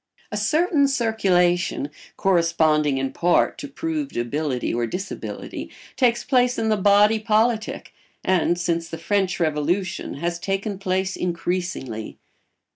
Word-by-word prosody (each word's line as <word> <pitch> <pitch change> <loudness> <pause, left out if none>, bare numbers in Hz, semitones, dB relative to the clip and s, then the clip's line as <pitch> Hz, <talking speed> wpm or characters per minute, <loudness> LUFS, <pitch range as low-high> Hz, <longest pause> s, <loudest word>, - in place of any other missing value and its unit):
A 210 - -2
certain 300 - +2
circulation, 185 - +1 0.3
corresponding 160 -6 +2
in 135 0 -2
part 175 0 +2
to - - -5
proved 305 0 -4
ability 125 +2 -1
or 120 0 0
disability, 190 - -6 0.3
takes 240 -3 +2
place 250 -1 +2
in 220 - 0
the 215 - +3
body 205 +2 +4
politic, 220 +1 0 0.3
and, 175 -2 +2
since 170 -1 -1
the 165 - -5
French 185 +2 0
Revolution, 165 +4 -1
has 170 +4 -2
taken 195 +2 -2
place 190 -1 -1
increasingly. 175 -10 -3
185 Hz, 120 wpm, -23 LUFS, 165-220 Hz, 0.3 s, body